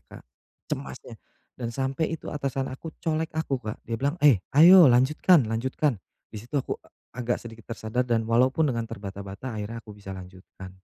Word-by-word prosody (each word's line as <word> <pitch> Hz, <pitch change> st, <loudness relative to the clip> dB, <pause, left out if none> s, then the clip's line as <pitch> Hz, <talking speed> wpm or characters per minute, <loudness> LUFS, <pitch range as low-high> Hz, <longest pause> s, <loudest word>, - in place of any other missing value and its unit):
Kak. -, -, -12 dB, 0.5 s
Cemasnya -, -, -6 dB, 0.4 s
dan 120 Hz, -2 st, -5 dB
sampe 135 Hz, +6 st, -1 dB
itu 165 Hz, -, -6 dB
atasan 140 Hz, -2 st, -2 dB
aku 135 Hz, +5 st, -8 dB
colek 160 Hz, 0 st, -1 dB
aku, 140 Hz, -5 st, -1 dB
Kak, 110 Hz, -2 st, -5 dB
dia 115 Hz, -, -8 dB
bilang, 140 Hz, +4 st, 0 dB
"Eh, 130 Hz, -10 st, +7 dB, 0.2 s
ayo 175 Hz, 0 st, +9 dB
lanjutkan 135 Hz, +5 st, +4 dB
lanjutkan." 115 Hz, +2 st, -1 dB, 0.3 s
Di 105 Hz, -, -6 dB
situ 120 Hz, +6 st, -6 dB
aku 135 Hz, -, -2 dB, 0.3 s
agak 120 Hz, 0 st, -1 dB
sedikit 115 Hz, -1 st, -12 dB
tersadar 115 Hz, +2 st, -2 dB
dan 115 Hz, -2 st, +1 dB
walaupun 130 Hz, +7 st, +3 dB
dengan 115 Hz, -1 st, -3 dB
terbata-bata 100 Hz, +4 st, -7 dB
akhirnya 110 Hz, +2 st, -6 dB
aku 105 Hz, -, -10 dB
bisa 100 Hz, -2 st, -9 dB
lanjutkan. 95 Hz, 0 st, -11 dB
120 Hz, 165 wpm, -26 LUFS, 110-140 Hz, 0.5 s, ayo